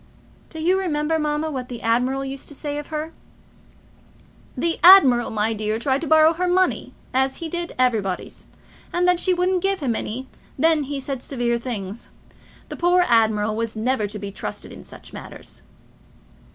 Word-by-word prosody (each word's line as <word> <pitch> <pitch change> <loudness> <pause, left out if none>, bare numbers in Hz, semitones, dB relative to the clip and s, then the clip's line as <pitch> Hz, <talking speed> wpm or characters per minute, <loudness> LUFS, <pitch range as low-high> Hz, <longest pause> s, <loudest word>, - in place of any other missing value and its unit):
"Do 320 - -9
you 360 +4 +2
remember, 320 -3 0
mamma, 300 +1 -1
what 255 -3 -5
the 240 -2 -7
admiral 250 +4 +1
used 270 0 -7
to 290 - -8
say 290 0 -4
of 295 - -8
her?" 315 +1 -5 1.4
"The 330 +5 -1
admiral, 280 -10 +8
my 220 +1 0
dear, 215 0 -2
tried 265 +3 0
to 330 - -3
borrow 315 +1 +5
her 360 +2 -1
money, 370 +1 +1 0.2
as 265 +1 +1
he 335 - -6
did 345 +1 -4
everybody's, 220 -7 -1 0.4
and 350 +1 +1
when 360 -1 +4
she 370 - +2
wouldn't 365 +1 +1
give 390 +1 0
him 255 -7 -1
any, 255 +5 -5 0.3
then 315 0 +3
he 280 0 -4
said 270 -1 -4
severe 240 -3 -1
things. 220 -3 -6 0.6
The - - -7
poor 355 +1 +3
admiral 220 -2 +2
was 230 0 -3
never 220 -1 0
to 210 +1 -7
be 200 -1 -6
trusted - - -7
in - - -11
such - - -13
matters." - - -10
270 Hz, 175 wpm, -22 LUFS, 230-325 Hz, 1.4 s, admiral